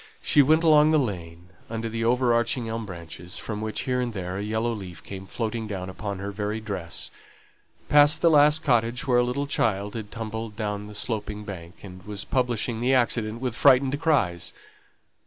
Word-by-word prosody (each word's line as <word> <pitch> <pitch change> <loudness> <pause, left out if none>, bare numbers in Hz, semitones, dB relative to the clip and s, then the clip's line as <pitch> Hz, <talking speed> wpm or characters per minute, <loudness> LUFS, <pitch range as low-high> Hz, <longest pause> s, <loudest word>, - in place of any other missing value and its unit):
She 145 - +5
went 155 +4 +4
along 155 -2 +6
the 155 - +4
lane 90 - -4 0.2
under 115 0 -3
the 115 0 -3
over 120 +1 +3
arching 120 0 0
elm 110 -1 -4
branches, 90 0 -8
from 105 -1 -5
which, 110 0 -3
here 125 -1 0
and 120 -2 -2
there, 95 -1 -4
a - - -3
yellow 110 +2 -1
leaf 90 -7 -8
came 95 -1 -8
floating 115 0 -3
down 95 -3 -5
upon 100 +1 -5
her 100 +1 -5
very 105 +2 -3
dress; 95 -6 -5 0.8
past 145 +2 +6
the 170 - +6
last 150 +1 +5
cottage 120 +2 +1
where 125 -3 +3
a - - +4
little 125 +4 -1
child 105 -7 0
had 110 -3 -6
tumbled 110 -1 -5
down 105 -1 -3
the 105 - -10
sloping 105 -1 -2
bank, 90 -3 -9
and 95 -2 -10
was 105 0 -7
publishing 120 -2 -1
the 130 +2 +3
accident 115 -2 0
with 125 -3 -2
frightened 135 +1 +4
cries. 100 - +1
110 Hz, 190 wpm, -25 LUFS, 100-125 Hz, 0.8 s, along